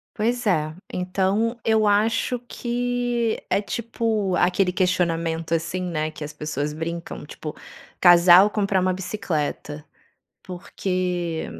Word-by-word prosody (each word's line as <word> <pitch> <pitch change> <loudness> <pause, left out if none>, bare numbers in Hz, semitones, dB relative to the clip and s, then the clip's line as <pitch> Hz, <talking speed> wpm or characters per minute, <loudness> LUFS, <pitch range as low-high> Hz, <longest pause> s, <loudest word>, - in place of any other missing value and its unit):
Pois 240 +2 -1
é, 155 -4 +1 0.2
então 195 +6 0
eu 220 -1 +3
acho 225 +4 +2
que 245 -1 -2
é 200 - +2
tipo 220 -3 -1
aquele 180 +1 +2
questionamento 165 -3 0
assim, 170 +3 -1
né, 155 -3 -2
que 155 - -8
as 150 0 -7
pessoas 150 -1 -3
brincam, 165 0 -5
tipo, 150 0 -8 0.5
casal 175 +2 +8
comprar 200 -3 0
uma 185 0 +2
bicicleta. 160 -6 -4 0.6
Porque 180 -2 -3
185 Hz, 115 wpm, -23 LUFS, 165-215 Hz, 0.6 s, casal